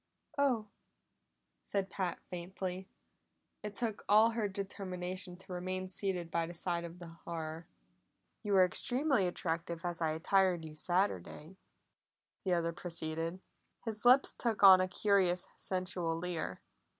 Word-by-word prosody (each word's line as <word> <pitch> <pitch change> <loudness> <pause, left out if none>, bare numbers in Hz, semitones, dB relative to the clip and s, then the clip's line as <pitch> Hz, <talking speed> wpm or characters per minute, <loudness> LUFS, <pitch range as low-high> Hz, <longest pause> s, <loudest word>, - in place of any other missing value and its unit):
"Oh!" 265 -7 +2 1.0
said 195 -2 -2
Pat 185 -3 -2
faintly. 185 +1 -4 0.7
It 210 -1 -6
took 225 -2 -2
all 215 +2 +7
her 225 -2 0
determination 185 -2 -4
to 190 0 -9
remain 185 +1 -3
seated 185 -3 -2
by 165 -1 0
the 175 - -8
side 170 0 -2
of 170 +1 -9
the 175 -2 -9
horror. 165 -1 -5 0.7
"You 205 -2 -1
were 190 -1 +7
extremely 250 +2 +1
attractive 170 -1 -3
as 175 -1 -3
I 160 -1 +2
attired 180 +1 +2
you 155 - -8
Saturday," 175 - -1 0.9
the 185 - +1
other 170 -1 0
proceeded. 165 +1 -3 0.4
His 220 -2 -4
lips 255 +3 +6
took 225 -4 -1
on 190 -1 +10
a 185 - +1
curious 185 -2 +2
sensual 180 -3 -2
leer. 175 -1 -3
185 Hz, 135 wpm, -34 LUFS, 170-200 Hz, 1.0 s, on